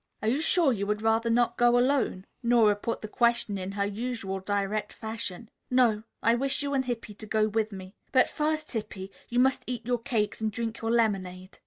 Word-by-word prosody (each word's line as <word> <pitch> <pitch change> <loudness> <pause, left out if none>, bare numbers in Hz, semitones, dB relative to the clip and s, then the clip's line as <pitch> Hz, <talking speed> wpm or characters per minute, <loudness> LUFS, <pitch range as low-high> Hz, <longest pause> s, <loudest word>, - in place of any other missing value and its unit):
"Are - - 0
you 260 +7 +2
sure 325 -4 +3
you 200 -2 -3
would 210 +1 -1
rather 225 +1 +2
not 235 +1 +2
go 240 0 +5
alone?" 250 -7 +1 0.2
Nora 235 -4 +4
put 225 +3 -4
the - - -3
question 235 -3 +1
in 190 +1 -5
her 200 0 0
usual 205 -2 -3
direct 205 +2 -2
fashion. 220 -2 -5 0.2
"No; 245 -4 +3 0.2
I 230 - +5
wish 270 +3 +1
you 285 0 -2
and 265 -1 +1
Hippy 230 -3 -4
to 215 +1 -9
go 215 0 +2
with 220 0 -1
me. 190 -1 -9 0.2
But 260 -1 +5
first, 310 0 -2
Hippy, 210 -4 -5 0.2
you 240 - -2
must 265 +1 +3
eat 245 -3 -4
your 245 0 0
cakes 225 -4 -1
and 220 -1 0
drink 225 +1 -4
your 225 - -2
lemonade." 195 -5 -1
225 Hz, 205 wpm, -28 LUFS, 205-245 Hz, 0.2 s, go